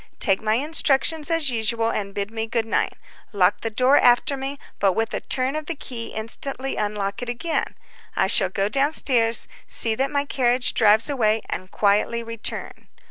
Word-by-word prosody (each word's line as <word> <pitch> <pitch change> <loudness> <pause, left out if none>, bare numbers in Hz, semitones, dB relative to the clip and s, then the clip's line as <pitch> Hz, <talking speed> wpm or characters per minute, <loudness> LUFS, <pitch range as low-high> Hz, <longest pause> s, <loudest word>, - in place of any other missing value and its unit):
Take 195 -4 +2
my 215 0 +1
instructions 300 +2 +1
as 330 -5 +2
usual, 225 0 0
and 200 -1 -4
bid 200 +1 -3
me 225 0 -4
good 225 0 -1
night. 225 - -1 0.4
Lock 195 -1 +2
the 225 - -3
door 255 +5 +3
after 245 +3 +3
me, 270 +1 -5 0.2
but 195 -2 +2
with 225 +3 -2
a - - -1
turn 260 +2 -1
of 310 -1 -5
the 335 - -4
key 240 -5 -6
instantly 260 +5 -3
unlock 205 -1 -3
it 245 - -5
again. 280 +7 -3 0.4
I - - +2
shall 190 -1 +4
go 195 +1 -1
down 275 +7 +1
stairs, 230 -6 +4 0.2
see 225 - +3
that 270 +5 -1
my 285 0 -1
carriage 250 -3 +1
drives 220 0 +4
away, 225 -6 +1
and 185 +1 -5
quietly 210 +4 +1
return. 230 -1 -6
230 Hz, 185 wpm, -22 LUFS, 215-270 Hz, 0.4 s, shall